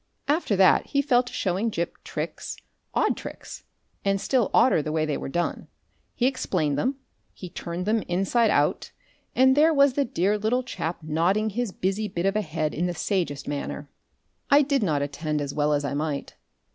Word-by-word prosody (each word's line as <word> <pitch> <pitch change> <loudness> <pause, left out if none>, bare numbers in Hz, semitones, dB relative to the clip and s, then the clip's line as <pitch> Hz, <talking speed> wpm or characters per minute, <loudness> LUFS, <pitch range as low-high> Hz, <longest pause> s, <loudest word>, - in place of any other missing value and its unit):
After 295 -8 +1
that 190 -1 +5
he 280 - +1
fell 250 -4 +4
to 250 - -10
showing 195 +4 0
Gip 170 -5 -4
tricks, - - -5 0.4
odd - - +2
tricks, - - -9 0.4
and 195 0 +1
still 245 +1 +1
odder 240 -9 +4
the 155 - -4
way 155 0 +1
they 150 -2 -1
were - - -5
done. 175 +5 -2 0.5
He 245 - +1
explained 180 - 0
them, 255 - 0 0.4
he 180 -3 -9
turned 175 +1 -5
them 220 +1 +2
inside 195 +6 +2
out, - - +1 0.4
and 260 +1 +5
there 310 +3 +5
was 280 -3 +4
the 280 - +2
dear 205 -3 0
little 235 +5 +1
chap 170 -8 -4
nodding 180 +8 +1
his 235 0 -2
busy 195 +4 -1
bit 175 -2 -3
of 195 +1 +1
a 215 - +2
head 155 -4 -2
in 175 +3 -1
the 175 - -3
sagest 165 -6 -2
manner. 145 0 -4 0.6
I 290 +1 +6
did 275 -1 +1
not 150 -8 +1
attend 150 +2 -2
as 140 -1 -3
well 150 0 +1
as 145 -1 +1
I 140 - -2
might. 145 -1 -3
190 Hz, 190 wpm, -25 LUFS, 155-240 Hz, 0.6 s, I